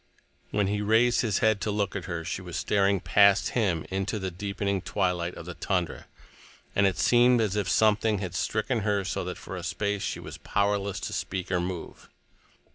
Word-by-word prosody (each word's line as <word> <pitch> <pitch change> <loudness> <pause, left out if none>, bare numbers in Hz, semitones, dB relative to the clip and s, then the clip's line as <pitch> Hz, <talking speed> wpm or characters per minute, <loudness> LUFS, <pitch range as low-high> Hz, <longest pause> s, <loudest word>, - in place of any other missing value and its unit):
When 105 -1 +1
he 105 +1 -1
raised 115 +3 +3
his 110 -5 0
head 110 -2 +3
to - - -1
look 100 -2 -1
at 95 -3 -4
her, 85 -3 -4
she 95 - -3
was 90 -2 -6
staring 100 -2 +2
past 100 0 +4
him 95 -9 0
into 95 +3 -1
the 95 -2 -3
deepening 100 +1 -2
twilight 90 -3 -1
of - - -9
the 90 - -6
tundra, 90 -1 -2 0.7
and 100 0 +4
it 95 -2 -1
seemed 120 +6 +5
as 105 -3 0
if 100 -4 -1
something 110 +1 +3
had 95 -3 -4
stricken 110 +7 -1
her 105 -1 0
so 90 - -2
that 90 - -5
for 95 - -8
a 90 - -5
space 100 +3 -2
she - - -3
was - - -9
powerless 100 -1 0
to - - -4
speak 95 -1 -3
or 90 - +2
move. 90 -1 -6
100 Hz, 200 wpm, -27 LUFS, 90-105 Hz, 0.7 s, seemed